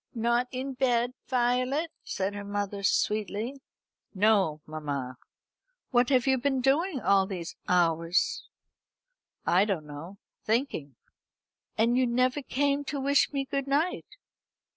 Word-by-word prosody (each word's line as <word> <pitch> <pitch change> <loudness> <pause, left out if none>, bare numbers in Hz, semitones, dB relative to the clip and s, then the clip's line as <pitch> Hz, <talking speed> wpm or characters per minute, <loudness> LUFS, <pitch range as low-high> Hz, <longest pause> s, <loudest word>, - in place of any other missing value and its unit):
"Not 235 +2 +1
in 265 +2 -4
bed, 245 -1 +1
Violet?" 255 +5 +1
said 195 +1 -2
her 205 0 -6
mother 205 0 -3
sweetly. 215 +6 0 0.5
"No, 195 -6 +3
mamma." 140 -5 -4 0.7
"What 245 0 +3
have 255 -3 +3
you 265 -1 +3
been 270 +1 +1
doing 285 +5 +1
all 195 -4 +3
these 180 -4 -6
hours?" 170 0 +2 1.0
"I 180 +3 +4
don't 195 -7 -2
know 150 +6 -9 0.3
thinking," 215 - -1 0.8
"And 235 +3 +3
you 255 - +3
never 255 +4 +1
came 280 +1 0
to 285 0 -3
wish 280 +1 +3
me 275 -2 -2
good 275 0 -3
night." 300 +6 -1
235 Hz, 125 wpm, -28 LUFS, 190-270 Hz, 1.0 s, I